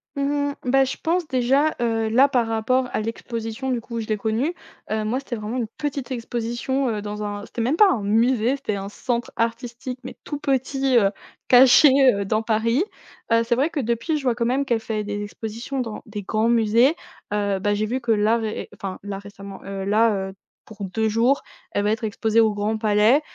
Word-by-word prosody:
Mmh 280 - -1 0.3
mh. 285 - -6
Bah, 270 +2 +4
je 265 - -3
pense 340 0 0
déjà, 270 +4 +2
heu, 225 -2 0
là 260 +5 +5
par 245 -4 +1
rapport 250 +3 +1
à - - -1
l'exposition 230 +2 -4
du 240 -2 -1
coup 235 0 -7
où - - -1
je 220 - -5
l'ai 215 - 0
connue, 225 - -1 0.4
heu, 215 0 -1
moi 245 +5 0
c'était 270 -3 -5
vraiment 215 +3 -4
une 235 - -1
petite 285 -3 -3
exposition, 240 +2 -2
heu, 215 -2 -2
dans 210 0 -5
un 205 0 -4
c'était 235 - -5
même 255 +7 +1
pas 405 +3 +6
un 225 - -1
musée. 230 +4 +2
C'était 240 -7 -3
un 195 0 -5
centre 240 +2 -3
artistique 235 +2 -3
mais 260 - -8
tout 290 - -5
petit, 270 -2 +1
heu, 200 -3 +4 0.4
caché, 260 +3 +8 0.2
heu, 200 0 -2
dans 215 +2 +1
Paris, 230 - +1 0.5
heu, 230 0 +4
c'est 235 - 0
vrai 280 +6 +1
que 315 - -3
depuis, 235 +5 -1
je 290 - -6
vois 250 -2 +2
quand 235 -1 -1
même 265 +3 +1
qu'elle 235 -4 +1
fait 220 -1 -3
des 205 0 -4
expositions 230 +6 -5
dans 225 -3 -5
des 210 -2 -6
grands 220 +4 +1
musées, 235 +6 +4 0.4
heu, 200 -2 0
bah, 205 +1 +1
j'ai 215 +1 0
vu 255 +4 -2
que 235 -2 0
là 215 +2 +3
ré 220 -1 -4
enfin 195 -3 -6
là 200 -1 -5
récemment, 200 -1 -10
heu, 195 0 -5
là, 205 -2 +2
heu, 190 - -10 0.3
pour 215 -2 -9
2 220 +4 -1
jours, 235 +6 +2 0.3
elle 205 - 0
va 210 - +2
être 220 +1 -2
exposée 220 +1 +2
au 220 -1 +3
Grand 210 +2 -1
Palais 215 +6 +4
230 Hz, 220 wpm, -23 LUFS, 215-255 Hz, 0.5 s, caché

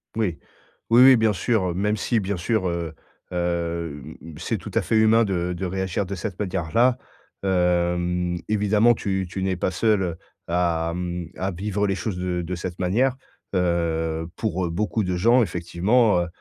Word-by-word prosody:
Oui. 105 -7 0 0.5
Oui 120 +2 +7
oui, 130 0 +9
bien 110 -1 +3
sûr. 95 -3 0
Même 105 +3 0
si, 115 +2 +1
bien 100 -1 -2
sûr, 95 +2 0
heu, 85 -2 -3 0.4
hem, 85 -4 -3 0.2
c'est - - -2
tout - - -9
à - - +4
fait - - -1
humain 110 +1 +5
de 90 -3 -1
de 90 +2 -4
réagir 95 +1 -2
de 95 - -5
cette 95 +1 -5
manière-là. 100 +6 +1 0.5
Hem, 90 -1 +1
évidemment, 105 +2 +3
tu 95 -3 -2
tu 95 +2 -4
n'es 95 -1 0
pas 95 - -1
seul 95 -4 +1 0.3
à 85 -1 0 0.4
à 95 +1 -1
vivre 100 +3 -1
les 95 - 0
choses 95 0 -3
de 90 -1 -2
de 90 +2 -4
cette 90 0 -6
manière. 120 +9 +2 0.4
Heu, 80 -2 0
pour 95 -4 -1
heu, - - -4
beaucoup 105 +5 -1
de 90 -1 -1
gens, 115 +8 +4
effectivement, 95 +3 +2
heu, 85 - -2
90 Hz, 170 wpm, -24 LUFS, 85-105 Hz, 0.5 s, oui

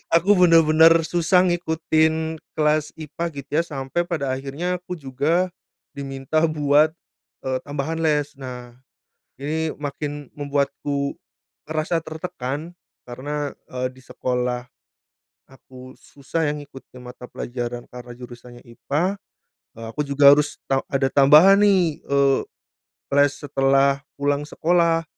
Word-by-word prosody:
Aku 195 +5 +4
benar-benar 165 -2 +6
susah 175 +2 +3
ngikutin 160 -2 0 0.2
kelas 150 0 +1
IPA 160 +2 -5
gitu 140 -2 -9
ya - - -5
sampai 145 +1 -3
pada 145 -7 -2
akhirnya 140 +7 -3
aku 180 0 -7
juga 155 +6 0 0.4
diminta 135 +2 -2
buat, 150 0 +3 0.5
eee, 130 -1 -1
tambahan 145 +3 -3
les. 150 -3 +1
Nah 125 -2 -8 0.6
ini 155 +3 -2
makin 145 0 -6
membuatku 140 -1 -2 0.5
ngerasa 160 +2 -1
tertekan 160 -2 -5 0.3
karena, 145 +4 -4 0.2
eee, 130 0 -2
di 130 - -17
sekolah, 125 -1 -2 0.9
aku 130 -1 -14
susah 145 +5 -3
ya - - +1
ngikutin 140 -3 -12
mata 125 0 -10
pelajaran 120 -1 -5
karena 125 0 -10
jurusannya 120 0 -12
IPA, 150 +10 -2 0.6
eee, 115 - -7
aku 150 - -3
juga 140 0 +7
harus 150 +1 +1
ta 135 0 +2
ada 135 -1 +2
tambahan 155 +8 +7
nih, 185 -7 +3
eee, 140 -1 +2 0.8
les 145 0 +5
setelah 135 0 +2 0.2
pulang 145 0 0
sekolah. 165 0 +2
145 Hz, 120 wpm, -22 LUFS, 135-160 Hz, 0.9 s, juga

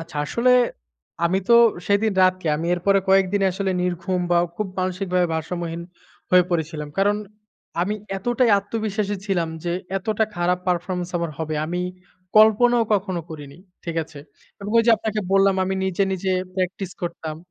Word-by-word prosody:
আচ্ছা। 165 - -9
আসলে 250 +7 +2 0.7
আমি 180 +3 +2
তো 235 - +7 0.3
সেদিন 205 +1 +2
রাত 185 0 +5
কি 170 - -8
আমি 165 - -3
এর 175 - -5
পরে 195 0 +5
কয়েকদিন 195 +1 +3
আসলে 190 +1 -2
নির্ঘুম 180 +1 -1
বা 175 - +4 0.2
খুব 210 - -2
মানসিকভাবে 185 -1 0
ভারসাম্যহীন 170 +1 -4 0.5
হয়ে 180 0 +6
পড়েছিলাম। 160 -3 -2
কারণ 205 +1 +3 0.7
আমি 205 +4 -1 0.2
এতটাই 240 +3 +1
আত্মবিশ্বাসী 205 0 -2
ছিলাম 175 -4 0 0.2
যে 170 - -1 0.3
এতটা 215 +3 0
খারাপ 175 +1 +1
পারফরম্যান্স 180 0 -2
আমার 170 -1 -2
হবে। 155 -1 -3
আমি 175 +2 -2 0.6
কল্পনাও 225 +2 +5
কখনো 190 -3 -1
করিনি। 145 -1 -9 0.3
ঠিক 170 -1 -4
আছে? 150 - -13 0.4
এবং 200 +1 -5
ওইযে 230 +1 +4
আপনাকে 215 0 -2
বললাম 195 0 +4
আমি 190 +1 -1
নিজে, 190 +1 0
নিজে 190 0 -1 0.2
প্র্যাকটিস 185 0 -2
করতাম 165 -3 -4
185 Hz, 155 wpm, -22 LUFS, 175-205 Hz, 0.7 s, তো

